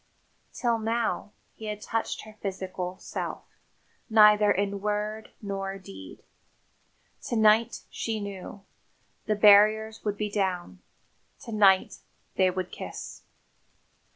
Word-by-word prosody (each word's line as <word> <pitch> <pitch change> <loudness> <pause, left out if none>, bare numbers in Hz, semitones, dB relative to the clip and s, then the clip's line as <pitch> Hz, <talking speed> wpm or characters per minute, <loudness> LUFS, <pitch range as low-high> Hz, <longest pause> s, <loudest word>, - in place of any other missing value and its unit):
Till 235 -3 0
now, 225 -1 -1 0.2
he 220 - -10
had 210 -1 -4
touched 225 +1 -3
her 215 - -12
physical 185 -2 -4
self - - -5 0.7
neither 210 -1 +6
in 200 0 -1
word 210 +1 -2
nor 195 -1 -4
deed. 95 - -12 1.0
To - - -2
night, 220 +1 +3
she 225 -1 -3
knew, 200 0 -7 0.6
the 215 - +2
barriers 215 +1 +5
would 205 -1 -2
be 210 0 -2
down; 180 - -2 0.6
to 230 - -9
night 195 -3 +4 0.4
they 185 -1 +4
would 185 0 -4
kiss. - - -8
210 Hz, 115 wpm, -27 LUFS, 195-215 Hz, 1.0 s, neither